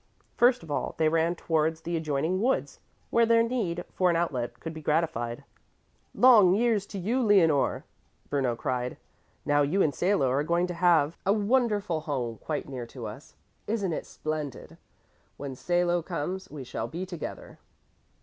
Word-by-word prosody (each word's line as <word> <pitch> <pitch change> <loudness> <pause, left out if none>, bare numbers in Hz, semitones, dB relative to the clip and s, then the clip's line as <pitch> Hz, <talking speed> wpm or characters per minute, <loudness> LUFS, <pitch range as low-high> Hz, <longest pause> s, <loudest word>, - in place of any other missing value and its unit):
First 245 0 +4
of 160 - -9
all - - -2
they 160 -1 +3
ran 165 +2 +1
towards 160 -1 0
the 170 +1 -3
adjoining 160 +4 -1
woods, 260 +4 0 0.3
where 230 0 +4
their 230 0 +5
need 210 -8 -2
for 185 -1 +2
an 170 - +2
outlet 135 -8 -2
could 165 - -6
be 160 - -8
gratified. 145 -6 -1 0.7
"Long 215 -8 +7
years 220 -3 +1
to 200 - -7
you, 225 +8 0
Leonore!" 175 - +3 0.4
Bruno 130 -4 0
cried. 125 +1 -3 0.5
"Now 145 0 +3
you 165 +8 +2
and 145 - +1
Salo 175 0 +2
are 135 +2 +2
going 170 +3 +1
to 180 - -4
have 170 -3 +3
a 195 - +3
wonderful 210 -5 +1
home 125 -7 -3
quite 155 - -4
near 125 -3 -6
to 120 -1 -8
us. 110 +7 -9 0.3
Isn't 205 -5 -1
it - - -5
splendid! 155 -3 -5 0.6
When 140 -2 -6
Salo 175 +3 +1
comes, 180 +3 -4
we 145 -3 -7
shall 125 - -4
be 175 +4 -5
together." 175 -4 -8
165 Hz, 165 wpm, -28 LUFS, 145-195 Hz, 0.7 s, Long